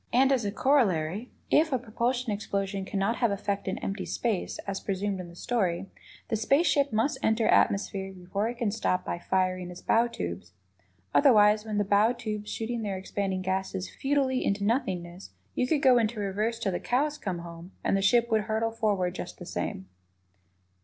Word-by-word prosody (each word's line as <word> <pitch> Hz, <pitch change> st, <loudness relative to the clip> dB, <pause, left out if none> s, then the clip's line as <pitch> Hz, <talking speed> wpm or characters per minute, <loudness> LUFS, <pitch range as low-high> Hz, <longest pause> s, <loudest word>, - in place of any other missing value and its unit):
And, 265 Hz, +3 st, +4 dB
as 260 Hz, -4 st, +2 dB
a 200 Hz, -, 0 dB
corollary, 210 Hz, -, +1 dB, 0.2 s
if 315 Hz, 0 st, +4 dB
a 260 Hz, -, +3 dB
propulsion 240 Hz, +1 st, -1 dB
explosion 200 Hz, -1 st, -2 dB
cannot 200 Hz, +4 st, -1 dB
have 235 Hz, -, +2 dB
effect 200 Hz, 0 st, -2 dB
in 190 Hz, +3 st, -1 dB
empty 195 Hz, -1 st, -3 dB
space, 220 Hz, -6 st, -1 dB
as 195 Hz, -1 st, -3 dB
presumed 195 Hz, 0 st, -2 dB
in 180 Hz, -, -6 dB
the 170 Hz, -, -13 dB
story, 190 Hz, -5 st, -1 dB, 0.4 s
the 225 Hz, -, +1 dB
space 275 Hz, +10 st, +3 dB
ship 280 Hz, -5 st, +2 dB
must 225 Hz, +6 st, +1 dB
enter 220 Hz, 0 st, +2 dB
atmosphere 195 Hz, -1 st, +2 dB
before 190 Hz, +4 st, -3 dB
it 240 Hz, -, -6 dB
can 235 Hz, -4 st, 0 dB
stop 190 Hz, -4 st, 0 dB
by 170 Hz, -, -3 dB
firing 185 Hz, 0 st, 0 dB
its 180 Hz, -, -10 dB
bow 230 Hz, +1 st, +3 dB
tubes. 90 Hz, -, -6 dB, 0.6 s
Otherwise, 210 Hz, -5 st, +5 dB
with 215 Hz, -1 st, -3 dB
the 205 Hz, -, +3 dB
bow 205 Hz, +4 st, +3 dB
tubes 215 Hz, -3 st, -5 dB
shooting 230 Hz, +1 st, -3 dB
their 200 Hz, -3 st, -2 dB
expanding 190 Hz, 0 st, -2 dB
gases 190 Hz, 0 st, -2 dB
futilely 270 Hz, -2 st, 0 dB
into 200 Hz, 0 st, 0 dB
nothingness, 185 Hz, -, -2 dB, 0.2 s
you 250 Hz, -, 0 dB
could 300 Hz, +2 st, +1 dB
go 255 Hz, -3 st, +6 dB
into 225 Hz, -1 st, -1 dB
"reverse" 210 Hz, +3 st, -1 dB
till 205 Hz, -4 st, -1 dB
the 175 Hz, -, -2 dB
cows 290 Hz, +4 st, 0 dB
came 190 Hz, -4 st, -3 dB
home 170 Hz, +1 st, -9 dB
and -, -, +2 dB
the 195 Hz, -, +1 dB
ship 235 Hz, +3 st, +3 dB
would 215 Hz, -1 st, +2 dB
hurtle 225 Hz, +1 st, 0 dB
forward 205 Hz, -5 st, 0 dB
just -, -, -7 dB
the -, -, -9 dB
same. 95 Hz, -, -4 dB
210 Hz, 185 wpm, -28 LUFS, 190-235 Hz, 0.6 s, go